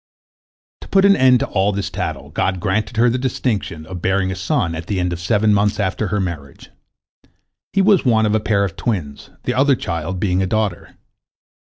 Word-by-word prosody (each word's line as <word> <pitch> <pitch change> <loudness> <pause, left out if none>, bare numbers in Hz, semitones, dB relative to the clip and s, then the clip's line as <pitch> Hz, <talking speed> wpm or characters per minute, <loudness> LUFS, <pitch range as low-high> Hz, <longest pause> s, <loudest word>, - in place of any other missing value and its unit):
" - - -81
To - - -10
put 195 0 +3
an 200 0 +6
end 130 -2 +4
to - - +1
all 100 +1 +1
this 100 -1 -3
tattle, - - -5
God 95 -1 -1
granted 110 +5 -1
her 120 +2 +4
the 125 +2 +1
distinction 110 -10 -2
of 90 0 -8
bearing 95 0 +1
a - - -4
son 90 -2 -1
at 80 +1 -6
the 100 -3 -1
end 90 0 -1
of 85 - -5
seven 105 +4 +2
months 105 +1 +1
after 100 +2 -1
her 105 +2 -1
marriage. 80 -7 -6 1.0
He 195 - +2
was 200 -2 +4
one 110 -3 +3
of 105 - +1
a 110 - +3
pair 100 -2 +1
of 95 -4 -3
twins, 85 - -4
the - - -1
other 135 +2 +3
child 85 -2 -4
being 95 -1 +1
a 95 - 0
daughter. 105 -2 -2
100 Hz, 210 wpm, -19 LUFS, 90-110 Hz, 1.0 s, an